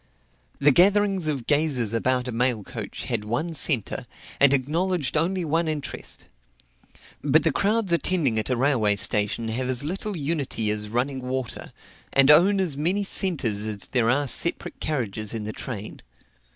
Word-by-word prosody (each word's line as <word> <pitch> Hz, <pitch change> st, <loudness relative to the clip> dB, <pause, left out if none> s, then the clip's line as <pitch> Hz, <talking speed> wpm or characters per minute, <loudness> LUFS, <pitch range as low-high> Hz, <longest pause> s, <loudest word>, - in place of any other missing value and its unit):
The 145 Hz, +1 st, +4 dB
gatherings 195 Hz, +2 st, +3 dB
of 140 Hz, -6 st, -2 dB
gazers 145 Hz, -7 st, +1 dB
about 125 Hz, +2 st, 0 dB
a -, -, -3 dB
mail 120 Hz, -2 st, 0 dB
coach -, -, -7 dB
had -, -, -2 dB
one 125 Hz, +11 st, -3 dB
centre, 135 Hz, -4 st, 0 dB, 0.3 s
and 140 Hz, -1 st, +6 dB
acknowledged 150 Hz, +3 st, 0 dB
only 175 Hz, +3 st, 0 dB
one 165 Hz, +2 st, 0 dB
interest. 155 Hz, -2 st, -5 dB, 1.0 s
But 150 Hz, +2 st, +3 dB
the 165 Hz, -, +2 dB
crowds 205 Hz, +3 st, 0 dB
attending 165 Hz, -9 st, +1 dB
at 110 Hz, -, -4 dB
a 125 Hz, -, 0 dB
railway 120 Hz, -6 st, +2 dB
station 105 Hz, +3 st, 0 dB
have 125 Hz, +3 st, -2 dB
as 130 Hz, +1 st, -2 dB
little 190 Hz, +5 st, -3 dB
unity 140 Hz, -8 st, 0 dB
as 105 Hz, 0 st, -3 dB
running 130 Hz, +4 st, -1 dB
water, 125 Hz, -1 st, -4 dB, 0.4 s
and 135 Hz, +1 st, +6 dB
own 190 Hz, +6 st, +5 dB
as 175 Hz, -7 st, -1 dB
many 175 Hz, +8 st, 0 dB
centres 140 Hz, -, +1 dB
as 110 Hz, -1 st, -4 dB
there 120 Hz, -3 st, +2 dB
are 140 Hz, +3 st, +1 dB
separate 170 Hz, +6 st, +1 dB
carriages 110 Hz, -7 st, -3 dB
in 110 Hz, -, -4 dB
the 110 Hz, +1 st, -5 dB
train. 110 Hz, -4 st, -7 dB
135 Hz, 160 wpm, -24 LUFS, 115-165 Hz, 1.0 s, and